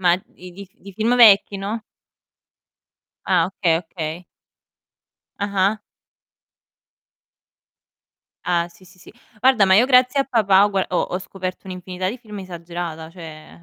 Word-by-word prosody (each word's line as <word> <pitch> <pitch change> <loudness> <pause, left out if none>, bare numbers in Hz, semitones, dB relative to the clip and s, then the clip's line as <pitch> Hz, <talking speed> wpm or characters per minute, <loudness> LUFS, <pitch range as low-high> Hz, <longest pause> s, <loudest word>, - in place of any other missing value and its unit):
Ma 175 -2 +4 0.2
i 180 0 -11
di 200 +3 -10
f 190 - -37
di 200 0 -13
film 225 +5 0
vecchi, 205 -4 +6
no? 210 +3 -4 1.5
Ah, 180 -3 +3
okay, 175 -3 +1
okay. 165 0 -7 1.1
Ah-ah. 200 +1 0 2.7
Ah 175 -1 +1
sì, 170 +2 -20
sì, 185 0 -20
sì. - - -15 0.3
Guarda, 255 -3 +4
ma 190 - +4
io 235 +6 +5
grazie 250 +1 +4
a 275 - +3
papà, 200 -6 +3
ho - - 0
gua 195 -2 -1
ho 180 - -1
ho 180 - -3
scoperto 185 0 -7
un'infinità 185 0 -5
di 245 - -7
film 210 -3 -10
esagerata, 170 -3 -7
cioè, 165 -2 -12
190 Hz, 140 wpm, -21 LUFS, 175-205 Hz, 2.7 s, vecchi